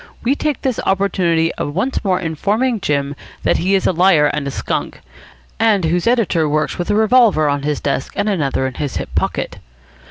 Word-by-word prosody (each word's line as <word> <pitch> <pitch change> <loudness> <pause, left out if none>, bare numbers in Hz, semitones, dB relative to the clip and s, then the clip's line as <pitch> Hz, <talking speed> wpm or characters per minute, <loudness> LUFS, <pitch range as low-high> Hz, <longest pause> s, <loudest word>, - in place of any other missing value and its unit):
We 250 - +2
take 295 -1 -2
this 260 -4 -1
opportunity 180 -4 +1
of 145 - -3
once 255 +9 -1
more 185 -3 +1
informing 205 - -1
Jim 140 -4 -1 0.3
that - - +2
he 190 +3 +1
is 190 - 0
a - - +3
liar 175 -3 +4
and 145 -1 -1
a - - -1
skunk," - - -3 0.6
and 210 -6 +3
whose 170 +4 0
editor 205 -10 +2
works 150 -1 -1
with 175 - -3
a 205 - +2
revolver 220 -7 +4
on 145 0 0
his 145 0 -2
desk 140 -1 -2
and 205 - -1
another 145 -9 0
in 130 - -3
his 145 +1 -4
hip - - -6
pocket. - - -2
175 Hz, 195 wpm, -18 LUFS, 150-210 Hz, 0.6 s, liar